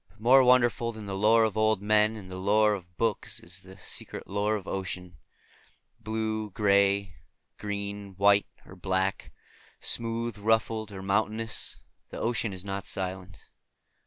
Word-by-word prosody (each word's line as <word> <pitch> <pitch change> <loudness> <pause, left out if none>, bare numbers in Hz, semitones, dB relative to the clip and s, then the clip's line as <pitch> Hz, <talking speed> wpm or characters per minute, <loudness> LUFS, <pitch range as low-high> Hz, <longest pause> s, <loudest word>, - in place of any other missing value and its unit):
But 110 - -26
more 130 +4 +6
wonderful 120 -2 +3
than 110 -2 -9
the 100 - -5
lore 110 +3 +4
of 110 -3 0
old 110 -1 +2
men 105 +1 +3
and 95 -4 -10
the 95 - -6
lore 105 +2 +3
of 90 -3 -8
books 115 -3 -1
is 90 +2 -8
the 95 +1 -14
secret - - -6
lore 105 +2 0
of 100 -3 -6
ocean. 90 -3 -5 0.8
Blue, 110 -1 -2
green, 100 -2 +2 0.5
gray, 100 -1 -4
white 100 +1 +3 0.2
or 95 - -13
black; 95 +1 -1 0.5
smooth, 115 -1 0
ruffled, 110 0 +1
or 95 -1 -8
mountainous; 110 +3 -1 0.3
that - - -8
ocean 115 -1 0
is 95 0 -5
not 100 0 -4
silent. 95 0 -4
105 Hz, 150 wpm, -28 LUFS, 95-110 Hz, 0.8 s, more